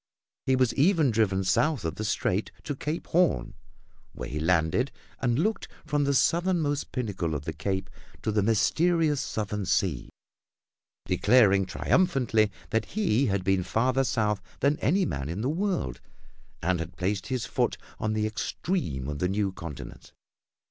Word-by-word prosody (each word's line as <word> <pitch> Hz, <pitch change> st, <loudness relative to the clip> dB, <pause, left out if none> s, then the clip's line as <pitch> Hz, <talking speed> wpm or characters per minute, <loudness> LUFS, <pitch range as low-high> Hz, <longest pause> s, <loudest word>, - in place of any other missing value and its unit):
He 130 Hz, -, +4 dB
was 130 Hz, -2 st, +2 dB
even 155 Hz, -2 st, +3 dB
driven 100 Hz, -4 st, +1 dB
south 140 Hz, -, +1 dB
of 80 Hz, -, -1 dB
the 110 Hz, -, -5 dB
strait 105 Hz, -1 st, 0 dB
to 145 Hz, -, -3 dB
Cape 150 Hz, +5 st, -3 dB
Horn, 160 Hz, -, +1 dB, 0.6 s
where -, -, -6 dB
he 75 Hz, -, -3 dB
landed 85 Hz, -, +2 dB, 0.3 s
and 120 Hz, -2 st, +1 dB
looked 205 Hz, +6 st, 0 dB, 0.2 s
from 145 Hz, -1 st, +1 dB
the 140 Hz, 0 st, +1 dB
southernmost 165 Hz, 0 st, +1 dB
pinnacle 95 Hz, -, -2 dB
of 75 Hz, 0 st, -5 dB
the 80 Hz, -, -3 dB
cape 95 Hz, 0 st, -2 dB, 0.4 s
to 110 Hz, -, 0 dB
the 105 Hz, 0 st, +2 dB
mysterious 150 Hz, -, +2 dB
southern 105 Hz, -1 st, -3 dB
sea, 85 Hz, -12 st, 0 dB, 1.0 s
declaring 100 Hz, +1 st, +4 dB
triumphantly 120 Hz, -, +2 dB, 0.2 s
that 110 Hz, -1 st, +1 dB
he 140 Hz, -, +1 dB
had 100 Hz, -2 st, 0 dB
been 95 Hz, 0 st, +2 dB
farther 125 Hz, +8 st, +1 dB
south 105 Hz, -4 st, 0 dB, 0.2 s
than 140 Hz, +2 st, +2 dB
any 185 Hz, +6 st, +2 dB
man 70 Hz, -, -3 dB
in 90 Hz, +5 st, -3 dB
the 125 Hz, -, 0 dB
world 160 Hz, -, -1 dB, 0.6 s
and 90 Hz, +1 st, +1 dB
had 85 Hz, +2 st, -6 dB
placed 95 Hz, +2 st, -1 dB
his 130 Hz, -2 st, -2 dB
foot 125 Hz, -1 st, 0 dB, 0.2 s
on 110 Hz, 0 st, -1 dB
the 110 Hz, 0 st, 0 dB
extreme 110 Hz, -, -2 dB
of 75 Hz, 0 st, -4 dB
the 90 Hz, -, +1 dB
new 100 Hz, 0 st, 0 dB
continent. 80 Hz, -7 st, -9 dB
110 Hz, 155 wpm, -27 LUFS, 95-140 Hz, 1.0 s, He